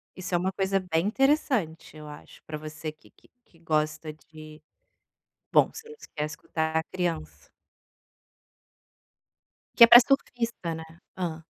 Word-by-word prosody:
Isso 185 Hz, 0 st, -7 dB
é -, -, +4 dB
uma 185 Hz, +2 st, -1 dB
coisa 195 Hz, 0 st, 0 dB
bem 180 Hz, -1 st, -1 dB
interessante, 250 Hz, -, 0 dB
eu 150 Hz, 0 st, -10 dB
acho, 150 Hz, 0 st, -13 dB
para 155 Hz, -, -6 dB
você 155 Hz, 0 st, -7 dB
que 155 Hz, -, -23 dB
que -, -, -27 dB, 0.2 s
que 165 Hz, -, -26 dB
gosta 155 Hz, -1 st, -2 dB
de 155 Hz, 0 st, -14 dB, 0.9 s
bom, -, -, +4 dB
você 450 Hz, 0 st, -11 dB
não 450 Hz, -, -12 dB, 0.2 s
quer 150 Hz, -, -2 dB
escutar 160 Hz, +1 st, -3 dB
criança. 165 Hz, -, -5 dB, 2.3 s
Que -, -, +8 dB
é -, -, +11 dB
para 240 Hz, +1 st, +11 dB
surfista, 235 Hz, -9 st, -1 dB
né? 160 Hz, -, -7 dB, 0.3 s
Hã. 165 Hz, -3 st, -4 dB
165 Hz, 140 wpm, -26 LUFS, 155-195 Hz, 2.3 s, é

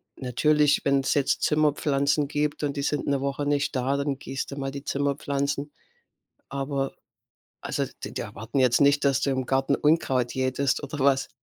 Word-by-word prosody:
natürlich, 145 Hz, +3 st, +2 dB
wenn's 140 Hz, -1 st, +2 dB
jetzt 140 Hz, -2 st, +1 dB
Zimmerpflanzen 145 Hz, -1 st, +2 dB
gibt 150 Hz, 0 st, -2 dB
und 140 Hz, -1 st, -1 dB
die 140 Hz, -, -2 dB
sind 150 Hz, 0 st, -1 dB
'ne 140 Hz, -1 st, 0 dB
Woche 140 Hz, +1 st, -2 dB
nicht 145 Hz, -1 st, 0 dB
da, 130 Hz, +2 st, 0 dB
dann 140 Hz, -1 st, -1 dB
gießt 135 Hz, -1 st, -5 dB
du -, -, -5 dB
mal 135 Hz, -1 st, -3 dB
die 140 Hz, 0 st, -7 dB
Zimmerpflanzen. 140 Hz, 0 st, -1 dB, 0.8 s
Aber 135 Hz, 0 st, -2 dB, 0.7 s
also -, -, -2 dB, 0.2 s
die -, -, -7 dB
die -, -, -3 dB
erwarten 115 Hz, +7 st, -4 dB
jetzt 125 Hz, -2 st, +4 dB
nicht, 140 Hz, 0 st, +4 dB
dass 135 Hz, -1 st, +3 dB
du 140 Hz, -, +1 dB
im 130 Hz, -1 st, -1 dB
Garten 135 Hz, +2 st, +1 dB
Unkraut 135 Hz, -5 st, +1 dB
jätetest 130 Hz, +1 st, 0 dB
oder 145 Hz, 0 st, -6 dB
was? 135 Hz, -1 st, +3 dB
140 Hz, 175 wpm, -26 LUFS, 135-145 Hz, 0.8 s, jetzt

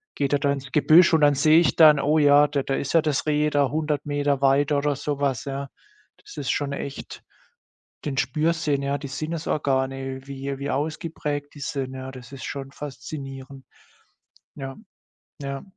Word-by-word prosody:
geht 140 Hz, -1 st, -1 dB
er 145 Hz, -, +3 dB
da 140 Hz, 0 st, +1 dB
ins 140 Hz, -1 st, -5 dB
Gebüsch 165 Hz, +3 st, +6 dB
und 160 Hz, -, +4 dB
dann 145 Hz, -1 st, +5 dB
sehe 155 Hz, +3 st, +5 dB
ich 170 Hz, -, +2 dB
dann: 155 Hz, -3 st, +7 dB
„Oh 150 Hz, +3 st, +2 dB
ja, 145 Hz, 0 st, +6 dB
da 145 Hz, -2 st, -1 dB
da 135 Hz, -, -1 dB
ist 140 Hz, -, -3 dB
ja 165 Hz, -, +5 dB
das 150 Hz, -1 st, -1 dB
Reh 150 Hz, 0 st, +2 dB
da 140 Hz, -2 st, +2 dB
100 150 Hz, -1 st, -2 dB
Meter 145 Hz, -1 st, 0 dB
weiter”, 140 Hz, +2 st, +3 dB
oder 145 Hz, 0 st, 0 dB
so 145 Hz, +1 st, -3 dB
was, 135 Hz, -5 st, -1 dB
ja. 140 Hz, 0 st, -4 dB, 0.5 s
Das -, -, -15 dB
ist 140 Hz, -3 st, -3 dB
schon 145 Hz, -1 st, -1 dB
echt 140 Hz, 0 st, -7 dB, 0.8 s
den 140 Hz, -2 st, -3 dB
Spürsinn, 150 Hz, +1 st, 0 dB
ja, 140 Hz, +1 st, -1 dB
die 140 Hz, -, -7 dB
Sinnesorgane, 135 Hz, -3 st, -2 dB
wie 135 Hz, 0 st, -5 dB
wie 140 Hz, -, -4 dB
ausgeprägt 150 Hz, 0 st, -3 dB
die 145 Hz, -, -12 dB
sind, 135 Hz, -2 st, -4 dB
ja, 130 Hz, 0 st, -6 dB
das 125 Hz, -1 st, -12 dB
ist 135 Hz, -, -8 dB
schon 135 Hz, -1 st, -6 dB
faszinierend. 135 Hz, -1 st, -8 dB, 0.9 s
Ja, 135 Hz, -1 st, -7 dB, 0.7 s
ja. 140 Hz, 0 st, -5 dB
140 Hz, 180 wpm, -24 LUFS, 135-150 Hz, 0.9 s, dann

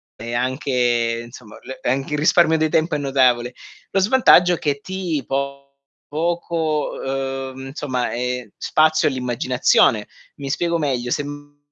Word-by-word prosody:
è 115 Hz, +1 st, -7 dB
anche, 120 Hz, -2 st, 0 dB
insomma, 120 Hz, -3 st, -13 dB
l 130 Hz, -, -9 dB
e -, -, -1 dB
anche 135 Hz, +3 st, -1 dB
il 150 Hz, -, 0 dB
risparmio 160 Hz, +1 st, +4 dB
di 155 Hz, 0 st, +1 dB
tempo 160 Hz, +1 st, +1 dB
è -, -, +1 dB
notevole. 130 Hz, -3 st, +2 dB, 0.4 s
Lo 195 Hz, -, +2 dB
svantaggio 190 Hz, -4 st, +5 dB
è 170 Hz, -, -2 dB
che 145 Hz, -2 st, -1 dB
ti 180 Hz, -5 st, -3 dB
po 140 Hz, 0 st, -3 dB, 0.4 s
poco, 160 Hz, -1 st, -2 dB
ehm, 135 Hz, 0 st, -4 dB
insomma, 130 Hz, -3 st, -3 dB
ehm, 125 Hz, -1 st, -3 dB
spazio 155 Hz, 0 st, +2 dB
all'immaginazione. 125 Hz, -4 st, +2 dB, 0.3 s
Mi 140 Hz, -1 st, -6 dB
spiego 170 Hz, +3 st, 0 dB
meglio: 130 Hz, -6 st, -1 dB
se 145 Hz, -, 0 dB
m 145 Hz, 0 st, -10 dB
135 Hz, 150 wpm, -21 LUFS, 125-155 Hz, 0.4 s, svantaggio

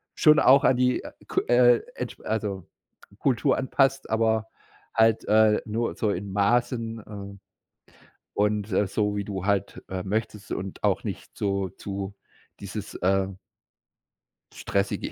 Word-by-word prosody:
schon 150 Hz, 0 st, +6 dB
auch 135 Hz, +2 st, +6 dB
an 130 Hz, -, +5 dB
die, 125 Hz, 0 st, +2 dB
äh, -, -, -8 dB, 0.2 s
K -, -, +1 dB
äh, 120 Hz, 0 st, +5 dB
entsch -, -, -6 dB
also 100 Hz, -5 st, -3 dB, 0.5 s
Kultur 135 Hz, 0 st, +2 dB
anpasst, 135 Hz, 0 st, +1 dB
aber 110 Hz, 0 st, +1 dB, 0.5 s
halt, 110 Hz, -1 st, +3 dB
äh, 110 Hz, 0 st, +4 dB
nur 115 Hz, +2 st, -2 dB
so 110 Hz, -, 0 dB
in 100 Hz, +1 st, -3 dB
Maßen, 115 Hz, +2 st, +1 dB
äh, 100 Hz, -1 st, -9 dB, 1.0 s
und 105 Hz, 0 st, +1 dB, 0.2 s
so 105 Hz, +1 st, -1 dB
wie 100 Hz, -, -2 dB
du 95 Hz, -2 st, -4 dB
halt, 100 Hz, -2 st, -1 dB
äh, 95 Hz, -1 st, -3 dB
möchtest 105 Hz, 0 st, -3 dB
und 95 Hz, 0 st, -6 dB
auch -, -, +1 dB
nicht -, -, -7 dB
so 100 Hz, -1 st, 0 dB
zu 100 Hz, +2 st, -6 dB, 0.5 s
dieses, -, -, -6 dB
äh 95 Hz, +1 st, +1 dB, 1.3 s
stressige 100 Hz, 0 st, -2 dB
105 Hz, 135 wpm, -26 LUFS, 100-115 Hz, 1.3 s, schon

